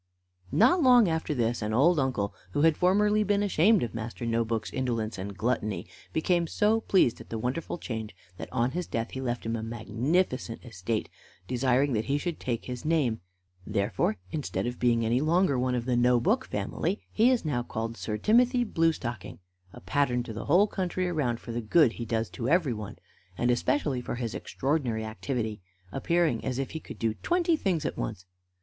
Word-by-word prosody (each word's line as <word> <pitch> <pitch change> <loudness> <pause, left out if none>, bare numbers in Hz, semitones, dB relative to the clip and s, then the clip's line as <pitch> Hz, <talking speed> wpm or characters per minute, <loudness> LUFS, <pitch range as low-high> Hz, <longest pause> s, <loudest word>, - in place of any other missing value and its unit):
Not 265 - +4
long 250 -6 +6
after 160 -2 -1
this 120 -1 0
an 105 +1 -1
old 160 +6 +4
uncle, 120 -7 -1 0.2
who 145 - +1
had 160 -1 +5
formerly 210 +5 +3
been 205 0 +1
ashamed 200 - +4
of 115 - -4
Master 115 +1 -5
No 115 0 +1
book's 110 -1 -3
indolence 115 -6 -2
and 100 +1 -6
gluttony, 110 -2 -1 0.3
became 170 +1 +1
so 220 +5 +2
pleased 185 - +2
at - - -14
the 115 - -3
wonderful 130 +10 -3
change 110 - -5 0.2
that - - -8
on 125 0 +1
his 180 +3 -3
death 115 0 -3
he 130 - -5
left 120 -2 -3
him 115 +1 -1
a 110 - -3
magnificent 120 - -1
estate, 110 -1 -3 0.4
desiring 130 +2 +2
that 110 0 0
he 140 +1 +1
should 170 +2 -3
take 120 -3 -3
his 125 -2 -6
name; 150 -8 +1 0.4
therefore, 105 +1 0
instead 150 -5 -2
of 120 0 -4
being 115 -2 +2
any 120 +3 +2
longer 155 -3 +2
one 125 0 +1
of 120 -1 -2
the 125 -1 +1
No 120 0 +4
book 225 - +1
family, 160 - -2
he 225 +3 +4
is 250 -8 +1
now 135 -6 0
called 115 -1 -4
Sir 105 -2 -3
Timothy 245 - +3
Blue 165 -7 +2
stocking, 120 -8 -6 0.3
a - - -12
pattern 125 +6 +1
to 115 - -7
the 110 - -6
whole 180 +7 +5
country 185 -2 -2
around 140 -9 -1
for 120 - -8
the 120 +1 -2
good 130 +4 +4
he 120 - -6
does 115 0 -1
to 115 +7 -3
everyone, 130 - 0 0.4
and 120 +1 +2
especially 130 +2 0
for 120 - -4
his 120 -2 -3
extraordinary 130 -6 -1
activity, 110 -1 -3 0.3
appearing 160 - +1
as 130 -2 -2
if 135 -1 -3
he 160 - -4
could - - -10
do 115 -1 0
twenty 345 -1 +2
things 185 - -1
at - - -3
once. - - -4
125 Hz, 195 wpm, -28 LUFS, 115-165 Hz, 0.4 s, long